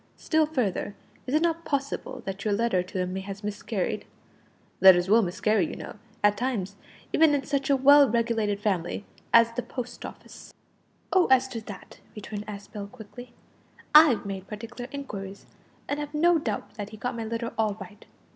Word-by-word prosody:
Still 315 -1 +2
further, 215 - -2 0.3
is 265 - 0
it 310 - +3
not 335 -1 0
possible 275 -3 -3
that 195 0 -5
your 210 -2 +1
letter 225 -4 +1
to 180 +1 -7
him 180 0 -2
may 190 - -3
have 195 +1 -8
miscarried? 210 0 -3 0.7
Letters 180 -2 +7
will 225 +3 +6
miscarry, 190 0 +1
you - - -6
know, - - -9 0.3
at 205 0 +4
times, 210 -6 -2 0.4
even 315 -2 +5
in 280 - -1
such 280 -1 -2
a 280 - +5
well 280 +1 +7
regulated 225 -3 0
family 200 -1 -2 0.3
as 230 0 +6
the 240 +2 -3
Post 245 +1 -7
Office." - - -11 0.6
"Oh! 370 -2 +5
as 260 0 +4
to 230 -3 -5
that," 205 - -10 0.2
returned 210 0 -7
Aspel 200 0 -7
quickly, 245 +1 -12 0.6
"I've 300 -9 +7
made 195 -1 -6
particular 240 +3 -8
inquiries, 200 -9 -7 0.4
and 285 - -2
have 295 0 -5
no 335 +2 +4
doubt 220 -8 -4
that 205 -1 -5
he 215 - -11
got 245 +3 -3
my 230 - -4
letter 230 +1 -4
all 215 -2 0
right. 200 +2 -11
225 Hz, 175 wpm, -27 LUFS, 200-265 Hz, 0.7 s, Letters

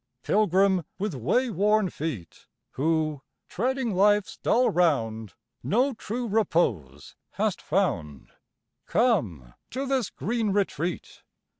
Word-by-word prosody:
Pilgrim 195 -2 +3
with 205 -2 -2
way 190 - 0
worn 210 +1 +2
feet, 135 - -6 0.2
Who, 155 0 0 0.3
treading 250 +2 -1
life's 205 +2 +3
dull 250 +2 +2
round, 115 - 0 0.3
No 255 +6 +1
true 235 +2 -4
repose 125 - -1 0.2
hast - - -1
found, 75 -3 -2 0.6
Come 110 - 0 0.2
to 265 +3 -3
this 265 -5 0
green 220 -1 -2
retreat. 180 -4 -2
190 Hz, 105 wpm, -26 LUFS, 145-225 Hz, 0.6 s, Pilgrim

